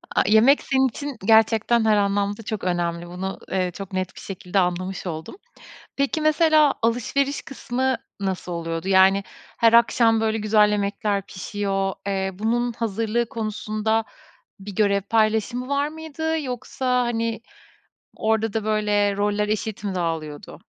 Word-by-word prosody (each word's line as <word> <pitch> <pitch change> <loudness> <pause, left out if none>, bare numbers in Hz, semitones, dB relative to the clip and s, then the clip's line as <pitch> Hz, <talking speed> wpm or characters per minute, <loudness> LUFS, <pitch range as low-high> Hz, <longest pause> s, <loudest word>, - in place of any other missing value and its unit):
A - - +4
yemek 230 +7 +5
senin 265 -1 +2
için 285 +2 -6
gerçekten 225 +1 +4
her 215 -1 +4
anlamda 205 +1 0
çok 215 -1 -4
önemli. 175 -1 -1
Bunu, 185 +2 -5
eee, 185 -1 0
çok 195 +1 -8
net 185 0 -3
şekilde 190 0 -3
anlamış 185 +1 -2
oldum. 160 - -6 0.6
Peki, 280 +3 0
mesela 310 -1 +4
alışveriş 250 +5 0
kısmı 260 -1 -2 0.2
nasıl 190 -2 -3
oluyordu? 165 +1 -4
Yani, 195 +1 +5 0.3
her 230 -1 +4
akşam 230 -1 +4
böyle 220 0 +1
güzel 210 -1 +3
yemekler 200 0 -1
pişiyor, 195 0 -2
eee, 190 -1 -1
bunun 235 +5 -1
hazırlığı 230 +1 -1
konusunda 220 0 -1 0.6
bir 195 0 -9
görev 200 -1 +2
paylaşımı 220 +4 0
var 280 +1 0
mıydı? 320 +1 -3
Yoksa, 250 -1 -1
hani, 230 -1 -2 0.8
orada 220 0 0
da 220 0 -2
böyle 210 -2 +1
roller 205 +1 0
eşit 215 -1 -3
mi 200 -2 -2
dağılıyordu? 160 -4 -4
215 Hz, 135 wpm, -23 LUFS, 195-235 Hz, 0.8 s, yemek